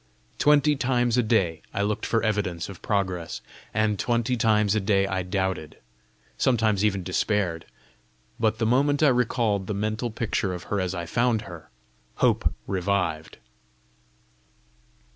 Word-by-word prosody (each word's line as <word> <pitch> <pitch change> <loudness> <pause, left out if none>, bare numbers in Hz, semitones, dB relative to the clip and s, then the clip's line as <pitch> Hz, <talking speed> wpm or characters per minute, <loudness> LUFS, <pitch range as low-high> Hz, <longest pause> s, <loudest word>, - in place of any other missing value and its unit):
Twenty 150 0 +4
times 120 -3 +1
a 125 - +4
day 100 -8 +1
I 100 - +1
looked 105 +1 -1
for 115 -1 +1
evidence 100 -6 -1
of 100 - -10
progress, 95 -5 -2 0.3
and 110 -2 0
twenty 120 +1 +1
times 105 -4 +2
a 110 - +2
day 100 -1 +2
I 95 -1 -1
doubted 95 -3 -3 0.6
sometimes 110 -5 +2
even 100 -3 +1
despaired; 90 -2 -1 0.7
but 110 -1 +1
the 115 - 0
moment 140 +5 +2
I 150 - +7
recalled 115 -6 +1
the 105 - -2
mental 110 +4 -2
picture 105 -4 -2
of 85 - -8
her 100 - +1
as 95 0 -2
I 85 -1 -4
found 115 +4 +1
her, 85 -6 -11 0.5
hope - - +2
revived. 90 -4 -1
105 Hz, 145 wpm, -25 LUFS, 95-115 Hz, 0.7 s, I